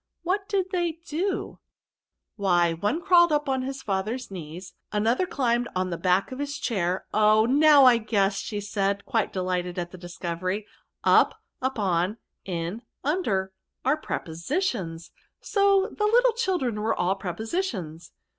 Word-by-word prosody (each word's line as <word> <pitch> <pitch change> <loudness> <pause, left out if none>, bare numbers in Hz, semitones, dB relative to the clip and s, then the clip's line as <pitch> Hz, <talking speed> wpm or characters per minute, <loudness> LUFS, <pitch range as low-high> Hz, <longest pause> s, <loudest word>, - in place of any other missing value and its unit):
What 395 +3 -1
did 380 -2 0
they 345 -3 0
do? 360 +6 -2 0.2
". - - -67
'* - - -59
Why 175 -5 +2
one 205 - -1
crawled 345 -3 +6
up 295 -1 +1
his 265 +1 -5
&ther*s 215 +5 -2
knees, 175 +1 -8 0.2
another 225 - +1
climbed 240 -4 0
on 185 0 -1
the - - -1
back 185 +5 +2
of 260 - -6
his 285 0 -3
chair 185 -5 -1
— - - -41
oh! 215 +1 +5
now 285 +2 +6
I 245 -2 +7
guess/' 205 -1 -1
said 200 -1 0
she, 200 - -23
quite 230 -6 0
delighted 180 -1 -2
at 175 -1 -3
the 185 - -11
discovery. 175 +3 -4 0.2
" - - -56 0.2
Up, - - 0 0.2
upon, 205 -6 0 0.3
in, 175 +4 -4 0.2
under, 210 - 0 0.3
are 270 +3 +4
prepositions; 170 - -3 0.3
so 400 0 +2
the 420 - 0
little 485 +2 +4
children 355 - -1
were 220 +1 +1
all 180 +2 +2
Prepositions." 195 - -4
215 Hz, 155 wpm, -26 LUFS, 185-295 Hz, 0.3 s, I